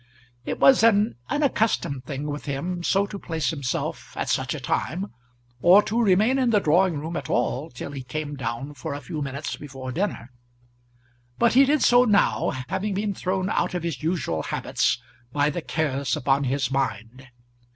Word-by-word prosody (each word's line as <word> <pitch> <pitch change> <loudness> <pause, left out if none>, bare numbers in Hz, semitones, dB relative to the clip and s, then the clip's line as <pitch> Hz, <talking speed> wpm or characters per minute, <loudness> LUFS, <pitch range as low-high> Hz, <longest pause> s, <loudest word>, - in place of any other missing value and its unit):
It - - -3
was 265 -4 +6
an 220 -1 +4 0.2
unaccustomed 225 - 0
thing 140 0 -5
with 145 0 -5
him 170 +6 -3
so 195 +3 +2
to 200 0 -7
place 160 -3 -2
himself 140 -5 -4
at - - -2
such - - 0
a - - -5
time, 185 +1 -2 0.5
or 185 +7 +7
to 230 +3 0
remain 215 +6 +3
in 255 -2 +2
the 215 -3 +4
drawing 175 0 +3
room 160 +4 -5
at - - -4
all 125 +5 0
till 125 +3 -7
he 140 -2 -6
came 145 +3 -5
down 135 +2 -4
for 140 +2 -5
a - - -5
few 155 0 -6
minutes 140 +2 -4
before 135 -3 -7
dinner; 135 - -3 1.1
but 235 - +3
he 270 +3 +7
did 295 +2 +2
so 245 0 +6
now, 210 -4 +2 0.2
having 190 +2 -2
been 205 +1 -1
thrown 185 0 -2
out - - 0
of 175 - -2
his 165 -7 -3
usual 155 - -1
habits 120 - 0 0.3
by 145 +2 +2
the 170 - -4
cares 145 -2 -1
upon 140 0 +1
his 130 -1 0
mind. 130 -1 -3
155 Hz, 180 wpm, -24 LUFS, 135-200 Hz, 1.1 s, or